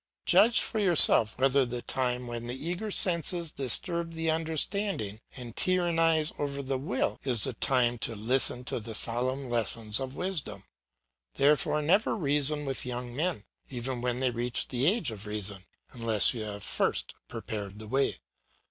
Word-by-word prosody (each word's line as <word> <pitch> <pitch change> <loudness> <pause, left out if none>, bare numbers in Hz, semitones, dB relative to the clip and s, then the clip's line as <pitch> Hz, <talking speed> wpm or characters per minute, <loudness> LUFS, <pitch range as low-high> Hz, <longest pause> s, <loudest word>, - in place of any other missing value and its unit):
Judge 225 +2 +5
for 220 - -3
yourself 170 - +6
whether 135 +1 +3
the 120 -1 -5
time 125 -1 -2
when 120 0 -6
the 120 - -3
eager 175 +10 -4
senses 170 -4 +1
disturb 165 +6 -3
the 160 0 -1
understanding 160 - -1 0.2
and 120 -3 -8
tyrannise 165 -3 +1
over 140 -1 -3
the 135 -1 -3
will, 130 -2 -2
is 120 -6 +5
the - - +4
time 120 -3 0
to 115 - +2
listen 125 +3 0
to 125 - -4
the 110 0 -8
solemn 130 +5 0
lessons 115 -2 0
of 135 0 -6
wisdom. 150 - -3 0.7
Therefore 150 +1 +2
never 195 +8 +2
reason 150 -4 +1
with 135 -1 0
young 125 -1 -6
men, 160 - -2 0.3
even 125 -1 -4
when 125 0 -2
they - - 0
have - - -10
reached 120 0 -1
the 130 +2 +1
age 185 - +1
of 105 -1 -9
reason, 100 -2 -4 0.3
unless 115 -5 +3
you 110 -3 -5
have 100 -1 -7
first - - -1
prepared 100 -2 -7
the 110 0 -9
way. 130 - -1
130 Hz, 165 wpm, -28 LUFS, 115-160 Hz, 0.7 s, yourself